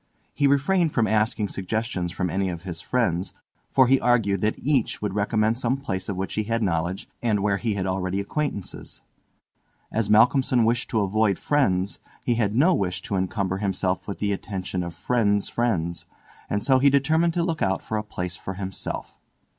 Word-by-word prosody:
He 145 - +2
refrained 155 +5 +2
from 120 -5 +2
asking 110 -1 +1
suggestions 95 -2 -2
from 90 -1 -2
any 95 +1 0
of 85 -1 -6
his 85 -3 -5
friends, 95 -7 -1 0.3
for 130 - +5
he 135 +2 +3
argued 105 -6 +2
that 105 +1 0
each 135 -5 0
would 105 -2 -3
recommend 110 +2 +1
some 130 +1 +1
place 95 -9 -4
of 100 - -2
which 95 +1 -3
he 110 - -1
had 115 +1 0
knowledge, 90 +1 -1
and 110 -4 +1
where 100 -1 +1
he 110 -1 -1
had 95 -2 -2
already 95 0 -1
acquaintances. 100 -1 -4 0.9
As 110 -2 0
Malcolmson 125 +2 +4
wished 120 +2 +1
to 110 - +1
avoid 100 0 +2
friends 100 -10 +1 0.2
he 120 - +1
had 110 -3 0
no 160 +9 +5
wish 90 - -1
to 100 - -3
encumber 95 0 -1
himself 95 -2 -1
with 100 - -4
the 100 -1 0
attention 95 -2 -4
of 85 -1 -5
friends' 105 0 +1
friends, 85 -8 -1 0.4
and 105 - -1
so 130 -1 +4
he 140 +2 +5
determined 160 +5 +2
to 170 - +2
look 165 -3 -2
out 95 0 0
for 110 - -4
a 105 - -1
place 90 -4 -5
for 95 - -6
himself. 95 0 -5
105 Hz, 185 wpm, -25 LUFS, 95-120 Hz, 0.9 s, for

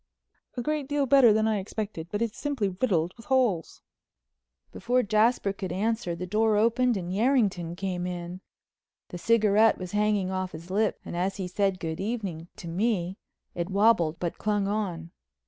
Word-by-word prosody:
"A 245 - -2
great 300 -1 -1
deal 290 -1 +1
better 265 -3 +6
than 220 +1 +2
I 215 -2 +1
expected, 195 -4 -5
but 205 +4 -1
it's 230 -1 -4
simply 275 -9 -1
riddled 180 -4 0
with 230 - -14
holes." 245 - 0 0.9
Before 250 +1 0
Jasper 215 -1 +2
could 190 -3 -5
answer 205 -1 -1
the 180 +2 -5
door 215 +3 +2
opened 235 +2 +2
and 180 -1 -4
Yerrington 200 -7 +1
came 180 -2 -3
in. 175 +1 -6 0.7
The 175 - -7
cigarette 220 +1 +4
was 185 -1 -7
hanging 205 -2 +1
off 185 -1 -3
his 165 +3 -9
lip 210 +2 +1
and - - -6
as 185 +3 -1
he 190 -2 -3
said 195 0 0
"Good 160 -1 -4
evening" 195 -6 -4
to 170 - -9
me 185 0 -1 0.3
it 170 +1 -3
wobbled 195 -5 +3
but 170 -2 -3
clung 205 -2 0
on. 180 -6 -3
200 Hz, 170 wpm, -27 LUFS, 180-225 Hz, 0.9 s, better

